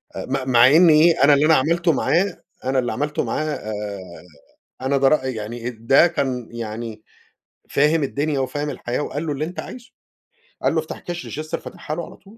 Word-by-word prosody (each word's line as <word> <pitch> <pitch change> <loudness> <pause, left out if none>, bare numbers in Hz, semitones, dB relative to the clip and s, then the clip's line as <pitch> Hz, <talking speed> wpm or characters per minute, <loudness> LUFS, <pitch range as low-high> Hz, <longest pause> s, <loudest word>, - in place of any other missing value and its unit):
م 130 0 -3
مع 120 0 +7
إن 165 +5 +6
إيه؟ 160 0 +5
أنا 145 - +7
اللي 145 +2 +4
أنا 160 0 +5
عملته 165 +5 +2
معاه 185 +7 0 0.2
أنا 130 0 +1
اللي 120 -2 -1
عملته 145 +2 -2
معاه 150 -8 -3 1.1
أنا 135 +1 +1
ده 135 - +4
رأ 135 -2 +2
يعني 120 0 -4
ده 120 +8 +4
كان 130 -8 -2
يعني 110 -1 -6 0.7
فاهم 150 +2 +2
الدنيا، 140 +1 -1
وفاهم 145 +3 -2
الحياة 120 -2 -4
وقال 150 +2 -4
له: - - -1
"اللي 150 +2 -2
أنتَ 175 +3 -7
عايزه" 250 0 -9 0.7
قال - - +2
له: - - +3
"افتح - - -8
كاش 175 -1 -6
register 155 0 -4
"فتحها 155 - -7
له 170 - -4
على - - -13
طول. - - -34
140 Hz, 185 wpm, -21 LUFS, 125-155 Hz, 1.1 s, مع